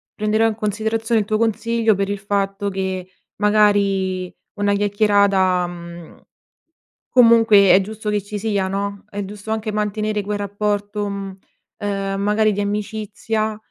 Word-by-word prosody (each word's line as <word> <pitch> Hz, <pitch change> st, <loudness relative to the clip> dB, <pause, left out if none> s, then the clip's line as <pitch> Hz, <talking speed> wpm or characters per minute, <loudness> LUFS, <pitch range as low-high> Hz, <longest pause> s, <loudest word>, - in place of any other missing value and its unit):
prenderò 215 Hz, +1 st, +2 dB
in 220 Hz, -, -1 dB
considerazione 220 Hz, +1 st, 0 dB
il 205 Hz, -, -6 dB
tuo 215 Hz, -, +1 dB
consiglio 230 Hz, 0 st, +1 dB
per 195 Hz, 0 st, -1 dB
il 205 Hz, -, -2 dB
fatto 200 Hz, 0 st, -2 dB
che, 190 Hz, -1 st, -3 dB, 0.3 s
magari, 200 Hz, -3 st, +2 dB, 0.2 s
una 205 Hz, -1 st, +1 dB
chiacchierata, 200 Hz, -3 st, +2 dB
mhmm, 170 Hz, -1 st, -10 dB, 0.9 s
comunque 225 Hz, -5 st, +6 dB
è -, -, +7 dB
giusto 210 Hz, +2 st, -5 dB
che 210 Hz, -1 st, 0 dB
ci 205 Hz, +2 st, -6 dB
sia, 205 Hz, -2 st, -1 dB
no, 200 Hz, +1 st, -4 dB
è 205 Hz, -1 st, -4 dB
giusto 205 Hz, +2 st, -8 dB
anche 220 Hz, 0 st, -2 dB
mantenere 210 Hz, 0 st, -1 dB
quel 205 Hz, +1 st, -3 dB
rapporto, 205 Hz, 0 st, -2 dB
mhmm, 195 Hz, -1 st, -6 dB, 0.4 s
ehm, 195 Hz, -1 st, -2 dB
magari 210 Hz, +1 st, +2 dB
di 205 Hz, -, -3 dB
amicizia 215 Hz, +1 st, -2 dB
205 Hz, 140 wpm, -20 LUFS, 195-215 Hz, 0.9 s, è